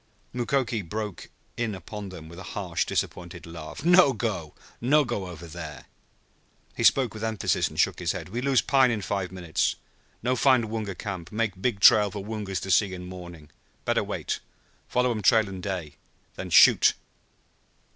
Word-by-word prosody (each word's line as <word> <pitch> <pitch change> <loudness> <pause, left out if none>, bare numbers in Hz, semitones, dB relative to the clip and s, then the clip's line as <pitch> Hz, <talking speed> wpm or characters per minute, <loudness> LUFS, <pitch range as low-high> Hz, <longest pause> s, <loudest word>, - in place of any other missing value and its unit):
Mukoki 120 -2 0
broke 105 +2 -5 0.3
in 115 -3 -1
upon 100 +3 -7
them 85 -4 -10
with 85 +2 -11
a 90 - -8
harsh 90 -5 -1
disappointed - - -3
laugh. 80 - -8
"No 175 -5 +6
go. 100 -9 -3 0.3
No 150 0 +5
go 105 -6 -3
over 85 -1 -9
there." 80 -3 -8 0.9
He - - -2
spoke 130 -5 +4
with 110 0 -7
emphasis, 110 -2 0
and - - -8
shook - - +2
his - - 0
head. - - -6
"We 120 +5 -3
lose 135 -1 +3
pine 135 -2 +4
in 110 -4 -2
five 95 -2 -2
minutes. 90 -4 -1 0.5
No 125 +2 +1
find 125 -4 +3
Woonga 105 -4 -4
camp 95 -5 -6
make 105 -4 -2
big 120 -4 0
trail 105 0 +7
for 100 0 -7
Woongas 105 -4 -3
to 95 - -3
see 95 0 +3
in 90 0 -8
morning. 85 -4 -10 0.3
Better - - +2
wait. - - -3 0.5
Follow 125 0 +1
um 110 -2 -2
trail 110 +1 +4
in 95 -1 -7
day, 90 -6 -5 0.4
then - - -7
shoot!" - - +7
100 Hz, 175 wpm, -26 LUFS, 90-115 Hz, 0.9 s, trail